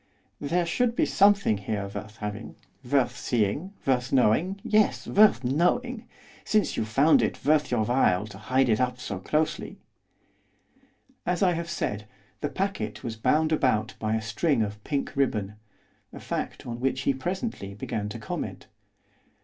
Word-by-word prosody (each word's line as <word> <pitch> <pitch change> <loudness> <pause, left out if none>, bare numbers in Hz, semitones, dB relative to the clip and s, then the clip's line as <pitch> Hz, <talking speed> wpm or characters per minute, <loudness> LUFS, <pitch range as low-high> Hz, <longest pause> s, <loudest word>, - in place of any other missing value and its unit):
There 170 +4 0
should 235 +7 0
be - - +3
something 200 - +4
here 100 0 -3
worth 105 +2 -8
having, 105 +1 -6 0.3
worth 130 0 +1
seeing, 125 - -1
worth 125 -2 +1
knowing, 145 - +2
yes, 215 -1 +2
worth 205 - +5
knowing! 220 - 0 0.4
since 215 -1 +1
you - - -1
found 135 +9 +4
it - - -2
worth 150 0 +3
your 115 -3 +1
while 105 -6 +2
to 100 -2 -11
hide 130 +5 +2
it 110 0 +2
up 125 0 -1
so 95 -6 -5
closely.' 155 +11 -1 1.5
As 180 +2 0
I 185 - +4
have 170 0 -4
said, 105 -10 -3 0.3
the 145 - -2
packet 140 - -3
was 115 -2 -4
bound 155 +8 +2
about 130 -8 +1
by 110 0 0
a 110 - -2
string 135 +1 +1
of 105 0 -6
pink 140 -1 -2
ribbon, 110 -7 0 0.6
a - - -9
fact - - -4
on 120 -1 -5
which 135 +1 0
he 135 - +2
presently 175 - -4
began 105 0 -4
to - - -6
comment. - - -5
130 Hz, 155 wpm, -27 LUFS, 110-170 Hz, 1.5 s, worth